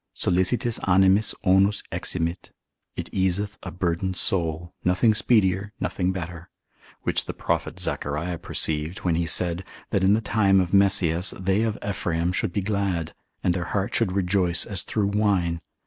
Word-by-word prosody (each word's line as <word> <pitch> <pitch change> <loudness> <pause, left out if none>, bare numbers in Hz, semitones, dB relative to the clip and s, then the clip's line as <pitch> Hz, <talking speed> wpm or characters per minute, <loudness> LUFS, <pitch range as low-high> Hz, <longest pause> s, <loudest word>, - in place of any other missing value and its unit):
Sollicitis 95 +7 +1
animis 95 +3 +3
onus 100 +1 +3
eximit, 85 0 -3 0.5
it - - -5
easeth 95 +2 -1
a - - -6
burdened 90 +1 -2
soul, 85 -2 -1
nothing 90 +5 +3
speedier, 105 -2 +2
nothing 90 0 -1
better; 90 -2 -7 0.5
which - - 0
the - - -6
prophet - - -2
Zachariah 80 +4 -3
perceived, 80 +3 -2
when 90 - +2
he 85 0 0
said, 85 +1 +2 0.3
that 95 - +1
in 95 +2 +5
the 110 - +3
time 100 -2 +3
of 90 0 -1
Messias, 95 -3 +3
they 95 +2 +1
of 110 -2 -1
Ephraim 85 -3 -1
should 90 - -1
be 100 - -1
glad, 95 -5 -2 0.3
and 90 - +2
their 85 -1 -3
heart 100 0 -2
should 105 -6 +1
rejoice 90 -2 +2
as 100 -4 -3
through 105 -2 -1
wine. 100 -5 +1
95 Hz, 155 wpm, -24 LUFS, 85-100 Hz, 0.5 s, in